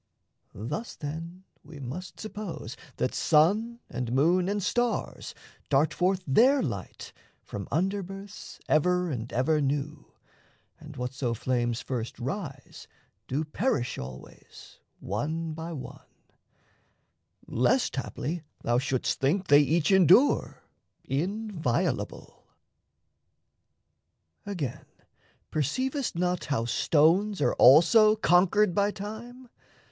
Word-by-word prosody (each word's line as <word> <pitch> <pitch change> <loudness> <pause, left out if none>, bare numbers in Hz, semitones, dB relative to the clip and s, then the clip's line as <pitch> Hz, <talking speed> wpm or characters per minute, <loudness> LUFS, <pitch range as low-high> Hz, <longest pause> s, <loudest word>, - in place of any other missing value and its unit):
Thus, 150 - -5
then, 165 +5 -7 0.2
we 150 0 -12
must 140 +8 -7
suppose 195 - -6 0.2
that 125 - -1
sun 210 +10 +2
and 125 -2 -4
moon 175 +8 +3
And 205 -1 -1
stars 240 +3 -2 0.3
dart 145 +2 +3
forth 185 +1 0
their 255 - +4
light 100 - -6 0.3
from 100 -2 -7
under 190 +6 0
births 195 +2 -10
Ever 180 +2 +2
and 120 -3 -5
ever 150 +5 +1
new, 145 +2 -3 0.7
and 150 -1 -11
whatso 125 -1 -2
flames 120 0 -1
First 120 -3 -4
rise 140 +3 -6 0.4
do 140 +4 -1
perish 150 - -1
always 65 0 -11 0.2
one 155 - -3
by 165 +2 -6
one 145 -6 -8 1.4
Lest, - - +1
haply, 160 +6 -4 0.2
thou 120 +1 +2
shouldst 130 -1 -1
think 175 +8 0
they 145 0 +8
each 155 +4 +1
endure 190 - +4 0.4
Inviolable. 175 - -2 2.0
Again, 165 -12 -4 0.7
perceivest 255 - -1
not 180 +1 -1
How 125 -6 -1
stones 170 - +2
are - - +2
also 175 - +7
conquered 190 0 +3
by 200 +2 +2
Time? 220 +5 -8
160 Hz, 105 wpm, -28 LUFS, 135-195 Hz, 2.0 s, they